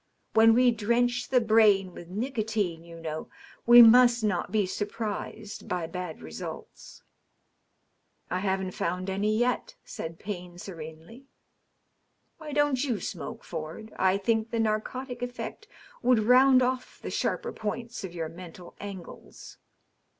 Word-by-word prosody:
When 225 0 +6
we 250 0 +5
drench 245 +3 0
the 255 - +4
brain 215 -5 +4
with 175 - -10
nicotine, 215 -6 -2
you 170 0 -11
know, 160 -1 -5 0.4
we 240 0 +11
must 240 0 +6
not 190 -5 0
be 215 -2 +2
surprised 210 +1 -5
by 180 -2 -1
bad 180 -1 -6
results." 80 -1 -9 0.6
" - - -41
I 180 - 0
haven't 190 -1 -1
found 180 +2 -2
any 210 +3 0
yet,'' 245 +1 0
said 165 0 -7
Payne 180 -3 -7
serenely. 170 - -10 0.6
" - - -47
Why 310 -2 -8
don't 290 -2 +2
you 245 -7 -1
smoke, - - -6
Ford? 165 +7 -7
I 190 +1 +2
think 220 +2 0
the 230 - -2
narcotic 245 +4 -2
effect 245 0 -6 0.3
would 250 -1 +4
round 255 +2 +6
off 255 0 -2
the - - -6
sharper 475 -1 -2
points 230 +2 -5
of 180 -2 -7
your 165 -2 -3
mental 175 +1 -11
angles." 190 - -10
215 Hz, 140 wpm, -28 LUFS, 180-240 Hz, 0.6 s, we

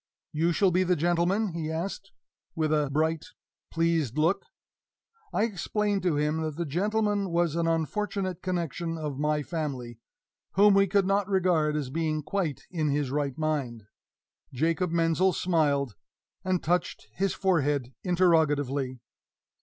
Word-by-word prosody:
"You 165 +3 +1
shall 190 +2 +3
be 180 +2 +2
the 180 0 +2
gentleman?" 175 +6 +1
he 165 -2 -4
asked, 185 +4 -4 0.4
with 155 -2 +1
a 150 -2 +1
bright, 160 +2 0 0.4
pleased 165 -6 0
look. 165 +5 +1 0.8
I - - +1
explained 210 -1 -1
to 175 -4 +1
him 150 +2 0
that 155 -2 -3
the 170 +2 -2
gentleman 205 +5 0
was 170 -2 +1
an 170 0 +1
unfortunate 185 +3 -1
connection 170 -2 -2
of 150 -3 -4
my 150 0 +1
family, 135 -8 -4 0.5
whom 205 +2 +6
we 195 0 +4
could 195 +1 +2
not 200 +1 +1
regard 175 -6 +2
as 140 -4 -3
being 155 0 -1
quite 170 -5 -2
in 155 -4 0
his 140 -2 0
right 140 -2 -1
mind. 140 -8 -2 0.7
Jacob 165 +6 0
Menzel 170 +2 +2
smiled, 145 - +1 0.5
and 185 -2 0
touched 175 -6 -1
his 195 0 -1
forehead 145 -8 +1
interrogatively. 145 -8 +2
165 Hz, 140 wpm, -28 LUFS, 150-185 Hz, 0.8 s, whom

